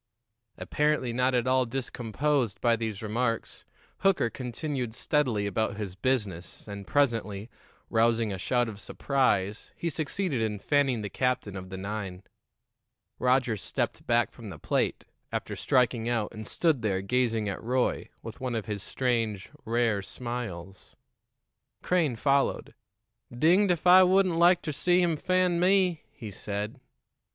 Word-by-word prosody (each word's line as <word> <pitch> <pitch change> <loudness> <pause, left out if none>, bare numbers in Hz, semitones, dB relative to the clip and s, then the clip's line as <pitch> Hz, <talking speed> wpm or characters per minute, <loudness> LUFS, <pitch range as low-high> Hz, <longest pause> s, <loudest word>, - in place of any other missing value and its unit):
Apparently 150 -5 0
not 125 +1 +2
at 120 -1 +1
all 130 -1 +2
discomposed 125 0 -1
by 120 -1 +3
these 110 -2 -4
remarks, 115 +2 -2 0.3
Hooker 190 -12 +2
continued 125 -1 -4
steadily 125 -10 +1
about 100 0 -1
his 100 -4 -4
business, 100 -6 -2
and 100 -2 -7
presently, 115 -6 0 0.4
rousing 115 -2 +2
a 95 - -5
shout 120 +5 +1
of 105 -3 -7
surprise, 110 -6 0
he 170 - -3
succeeded 155 - -1
in 110 -2 -1
fanning 135 -1 +1
the 105 - -4
captain 125 -6 -1
of 95 -1 -7
the 95 - -6
nine. 95 -1 -5 1.0
Roger 125 -2 +2
stepped 100 - -3
back - - +2
from - - -10
the - - -8
plate, - - -1 0.3
after - - -3
striking 120 -2 +1
out, 115 -3 -1
and 110 -1 -8
stood 160 -7 +1
there 95 -4 0
gazing 115 -1 +1
at 100 - -4
Roy, 125 +2 0
with 115 +1 -9
one 125 -2 -2
of 110 - -2
his 105 -2 -4
strange, 115 -6 -1
rare 115 -3 +1
smiles. 100 -6 -6 0.9
Crane 165 -8 +1
followed. 140 +3 +1 0.6
"Dinged 170 +11 +4
if 175 -1 -1
I 180 +1 +9
wouldn't 185 -1 +4
like 175 +1 +5
ter 155 - -2
see 175 +5 +2
him 175 -3 +2
fan 180 +2 +1
me!" 180 -2 +3
he 110 -4 -9
said. 105 +2 -5
120 Hz, 145 wpm, -28 LUFS, 105-145 Hz, 1.0 s, I